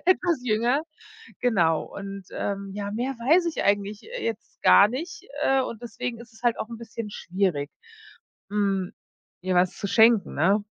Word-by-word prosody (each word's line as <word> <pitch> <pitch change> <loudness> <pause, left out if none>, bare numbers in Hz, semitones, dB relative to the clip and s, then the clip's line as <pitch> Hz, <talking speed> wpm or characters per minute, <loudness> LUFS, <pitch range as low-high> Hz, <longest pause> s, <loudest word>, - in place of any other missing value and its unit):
etwas 355 -5 +3
jünger. 240 +5 +2 0.6
Genau 175 -10 +2
und 195 -1 -8
ähm, 200 -1 -3
ja, 205 0 -4
mehr 245 +5 -2
weiß 295 +9 +3
ich 330 - -2
eigentlich, 205 +1 0
äh, - - -6
jetzt 225 -1 -5
gar 200 - +8
nicht, 315 +8 -6 0.2
äh, 270 0 +3
und 235 -2 -5
deswegen 240 0 -5
ist 235 -1 -13
es 225 - -18
halt 240 -1 +2
auch 220 - -3
'n 230 - -7
bisschen 225 -1 -7
schwierig, 175 -8 -1 0.8
mhm, 195 -3 0 0.5
ihr 185 0 -1
was 180 0 +2
zu 205 -2 -3
schenken, 220 0 +5
ne? 195 +7 +3
220 Hz, 165 wpm, -25 LUFS, 200-245 Hz, 0.8 s, gar